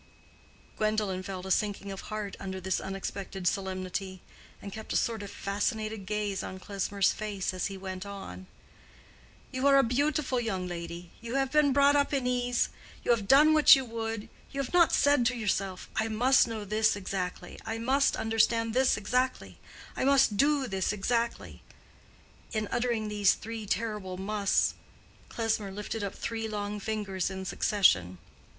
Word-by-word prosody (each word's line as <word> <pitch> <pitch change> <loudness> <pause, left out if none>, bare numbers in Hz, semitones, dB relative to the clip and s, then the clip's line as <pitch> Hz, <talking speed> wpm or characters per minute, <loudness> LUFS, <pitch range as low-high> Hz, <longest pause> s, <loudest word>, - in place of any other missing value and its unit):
Gwendolen 215 -3 0
felt 185 -1 -6
a 190 - -4
sinking 200 0 0
of 195 - -6
heart 210 -2 -4
under 190 -1 -5
this 190 +1 -1
unexpected 195 -1 -5
solemnity, 185 0 -3 0.4
and 200 - -8
kept 220 0 -8
a - - -1
sort 225 -2 0
of 200 - -7
fascinated 215 0 -3
gaze 210 -2 -1
on 185 - -6
Klesmer's 200 0 0
face, 200 -3 -3
as 185 - -1
he 195 - -7
went 185 -1 -6
on. 195 - -8 1.0
"You 260 +2 0
are 275 0 +6
a 275 - +6
beautiful 275 +2 +1
young 190 -6 -2
lady—you 175 +7 -7
have 270 -1 +1
been 300 -2 +4
brought 280 +1 +5
up 285 0 +2
in 265 -2 -1
ease—you 245 -1 -1
have 215 -4 +1
done 295 +5 +7
what 305 -2 +9
you 265 -1 -2
would—you 225 +3 -6
have 275 +2 -3
not 345 -2 +5
said 285 -3 +4
to 250 0 -1
yourself, 195 -4 -2
'I 220 - +1
must 245 +4 +4
know 220 -2 -5
this 215 +1 +2
exactly,' 185 -2 -4
'I 225 0 -2
must 265 +5 +2
understand 225 0 +1
this 260 +1 +3
exactly,' 250 +5 -1 0.4
'I - - -1
must 270 -6 +4
do 285 +4 +3
this 195 -5 -1
exactly,'"—in 220 0 -5
uttering 235 -3 0
these 205 -2 +3
three 225 -1 -7
terrible 210 -3 -2
musts, 200 +1 +1 0.6
Klesmer 220 -3 -1
lifted 210 +2 -4
up 200 - -4
three 225 -1 -3
long 210 -1 -4
fingers 200 -3 -2
in 190 0 -6
succession. 95 - +2
215 Hz, 155 wpm, -29 LUFS, 195-240 Hz, 1.0 s, what